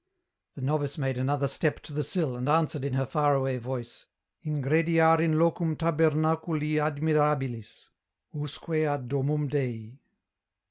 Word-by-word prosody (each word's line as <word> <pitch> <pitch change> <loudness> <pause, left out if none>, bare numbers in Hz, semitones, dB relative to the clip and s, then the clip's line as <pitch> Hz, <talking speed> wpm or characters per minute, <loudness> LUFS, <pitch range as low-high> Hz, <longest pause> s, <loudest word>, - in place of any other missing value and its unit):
The 135 - -7
novice 145 +1 -1
made 135 -3 -2
another 140 +2 0
step 145 +3 0
to 150 - -11
the 150 +1 -1
sill 155 -4 -1
and 125 +3 -3
answered 155 -2 +2
in 140 -2 -2
her 135 0 +1
far 145 +1 +2
away 135 -1 0
voice, 120 -1 -7
— - - -60
" - - -45
Ingrediar 160 +3 +3
in 160 -1 +2
locum 165 0 +1
tabernaculi 155 -1 +1
admirabilis: 150 -6 -1 0.4
usque 155 +2 -3
ad 145 -4 -3
domum 140 +3 0
Dei." 125 -3 -3
145 Hz, 145 wpm, -28 LUFS, 135-155 Hz, 0.4 s, Ingrediar